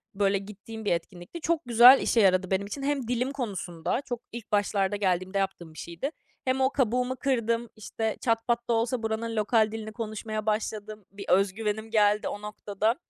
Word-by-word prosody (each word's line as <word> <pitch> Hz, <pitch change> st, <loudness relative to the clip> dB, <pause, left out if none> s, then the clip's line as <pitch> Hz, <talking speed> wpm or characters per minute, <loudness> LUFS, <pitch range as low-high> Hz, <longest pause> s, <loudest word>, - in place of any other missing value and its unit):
böyle, 200 Hz, 0 st, +2 dB
gittiğim 210 Hz, +3 st, -9 dB
bir -, -, +1 dB
etkinlikti. 175 Hz, -, -6 dB
Çok 330 Hz, 0 st, +1 dB
güzel 245 Hz, +3 st, +8 dB
işe 235 Hz, -, +2 dB
yaradı 185 Hz, -1 st, +3 dB
benim 195 Hz, +1 st, 0 dB
için. 275 Hz, +6 st, -6 dB
Hem 275 Hz, -4 st, -1 dB
dilim 250 Hz, +2 st, 0 dB
konusunda, 195 Hz, -, -3 dB
çok 245 Hz, -2 st, -4 dB
ilk 235 Hz, -1 st, -9 dB
başlarda 205 Hz, -1 st, +1 dB
geldiğimde 190 Hz, -1 st, 0 dB
yaptığım 190 Hz, -4 st, -3 dB
bir -, -, -11 dB
şeydi, 170 Hz, -, -4 dB, 0.3 s
hem 260 Hz, 0 st, +1 dB
o 260 Hz, -, +4 dB
kabuğumu 250 Hz, -1 st, 0 dB
kırdım, 235 Hz, -3 st, 0 dB
işte, 220 Hz, 0 st, -3 dB
çat 230 Hz, -1 st, 0 dB
pat 235 Hz, 0 st, 0 dB
da -, -, +4 dB
olsa 230 Hz, +1 st, 0 dB
buranın 225 Hz, +1 st, -2 dB
lokal 215 Hz, 0 st, +2 dB
dilini 220 Hz, -1 st, -6 dB
konuşmaya 215 Hz, -1 st, -4 dB
başladım. 215 Hz, -1 st, -3 dB
Bir 200 Hz, 0 st, -9 dB
öz 195 Hz, +1 st, +4 dB
güvenim 220 Hz, +1 st, -3 dB
geldi 210 Hz, -1 st, +3 dB
o 205 Hz, -, -5 dB
noktada. 210 Hz, +1 st, -1 dB
215 Hz, 185 wpm, -27 LUFS, 200-235 Hz, 0.3 s, güzel